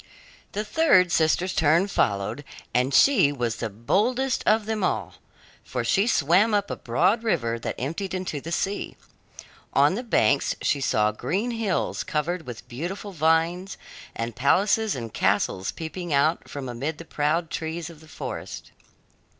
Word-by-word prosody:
The 210 +2 -2
third 200 - +4
sister's 165 +4 +2
turn 160 +5 +3
followed, 100 - -1 0.3
and 125 +2 +2
she 250 - +5
was 120 -5 -2
the 115 - -3
boldest 225 - 0
of 215 0 +3
them 220 -2 -2
all, - - -1 0.5
for 125 - -3
she 195 - +2
swam 190 +4 +3
up 205 -1 0
a - - -2
broad 185 - +1
river 115 - 0
that - - -4
emptied 165 +9 -3
into 180 -6 -4
the 165 - -7
sea. 195 +4 -2 0.8
On 145 +3 +4
the 220 - -2
banks 180 - +2
she 140 - 0
saw 105 -4 +2
green 185 - -2
hills 225 -5 -1
covered 160 +1 -2
with 120 -2 -8
beautiful 180 +11 -5
vines, 165 +3 +1 0.4
and 115 0 -4
palaces 200 - +2
and 115 -4 -6
castles 95 -1 0
peeping 170 +2 -6
out 150 +4 +1
from 140 -2 -6
amid 135 +6 -4
the 165 - -10
proud 155 +2 -1
trees 165 +1 -4
of 160 - -15
the 160 - -17
forest. - - -7
160 Hz, 155 wpm, -25 LUFS, 135-195 Hz, 0.8 s, she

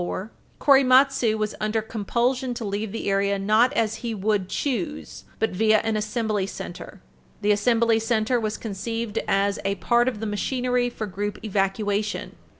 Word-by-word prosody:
34, 190 +4 -4 0.3
Korematsu 265 -4 +5
was 215 0 -2
under 215 +1 0
compulsion 240 +4 -1
to 230 - -5
leave 205 +1 -3
the 225 - -4
area 200 0 +1
not 215 +6 +3
as 225 -5 0
he 230 -2 -3
would 200 -2 0
choose, 180 - -3
but 220 - 0
via 215 +3 +3
an 220 -1 -1
Assembly 215 -2 -1
Center. 185 0 -8 0.4
The 210 0 +3
Assembly 225 +2 +3
Center 225 +1 +1
was 215 -1 -2
conceived 225 +1 -3
as 200 0 +1
a 195 0 0
part 240 +6 +2
of 245 -5 -1
the 220 - -4
machinery 245 +3 0
for 225 -2 -5
group 205 +1 -4
evacuation. 205 +1 -1
215 Hz, 155 wpm, -24 LUFS, 200-235 Hz, 0.4 s, Korematsu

